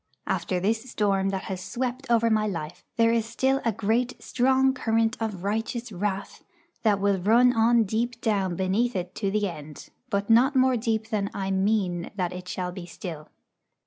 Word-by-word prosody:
After 185 - -1
this 220 +6 -1
storm 195 -3 +1
that 195 -1 -3
has 185 -1 -5
swept 255 +4 -4
over 230 -1 +3
my 215 -1 +2
life, 175 -2 -5
there 230 0 +4
is 230 0 -1
a 265 -3 +3
great 225 +5 0
strong 265 +1 +2
current 225 -2 +1
of 210 -5 -3
righteous 225 +3 -2
wrath 195 +1 -3 0.4
that 210 -3 +2
will 200 -1 +2
run 240 +6 +5
on 230 0 +4
deep 230 +3 -2
down 195 -6 0
beneath 200 +7 0
it 180 -1 -3
to 200 - -2
the 210 +1 0
end, 150 -4 -9 0.2
but 200 -2 -1
not 250 +5 +5
more 260 0 +4
deep 225 -1 -1
than 200 -2 0
I 195 -1 -2
mean 190 -3 0
that 180 -3 -2
it 180 0 -8
shall 180 0 -3
be 180 -1 -8
still. 165 -3 -7
215 Hz, 175 wpm, -26 LUFS, 190-235 Hz, 0.4 s, run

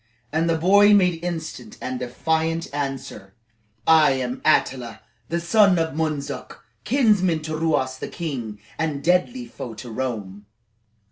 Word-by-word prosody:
And 165 +2 +1
the 165 - +2
boy 200 +5 +6
made 180 -4 +2
instant 175 +5 -5
and 130 0 -4
defiant 160 +6 -1
answer: 135 -9 -5 0.5
"I 155 -3 +6
am 130 -1 -3
Attila, 125 -7 +1 0.3
the 170 - 0
son 195 +2 +4
of 165 -3 0
Mundzuk, 145 -4 -4 0.2
kinsman 205 - +2
to 155 0 -3
Ruas 140 -5 0
the - - -4
king, 125 -11 -5 0.2
and 150 -3 -2
deadly 180 - +1
foe 120 - -8
to 115 +2 -9
Rome." 105 -5 -5
155 Hz, 135 wpm, -23 LUFS, 130-170 Hz, 0.5 s, boy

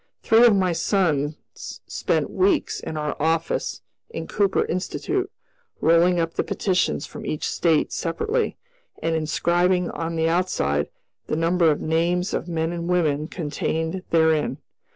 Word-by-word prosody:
Three 230 +2 +6
of 220 - +5
my 185 -2 +2
sons 160 -6 +1 0.2
spent - - -3
weeks 375 -3 +1
in 155 - -6
our 150 0 -2
office 165 +1 -1 0.3
in 460 - -5
Cooper 200 -2 +1
Institute, 375 - -2 0.5
rolling 170 +2 +4
up 165 0 -1
the - - 0
petitions 185 -6 0
from - - -9
each 155 - -2
State 165 -3 +1
separately, 430 - -1 0.4
and 165 0 0
inscribing 175 +3 +1
on 165 0 -4
the 160 0 +1
outside 75 - 0 0.4
the - - -1
number 165 +1 +3
of 150 - 0
names 170 +3 0
of - - -2
men 165 -1 -1
and 170 0 -4
women 155 -4 +1
contained 160 +1 -3
therein. 160 -2 +2
170 Hz, 140 wpm, -23 LUFS, 160-180 Hz, 0.5 s, Three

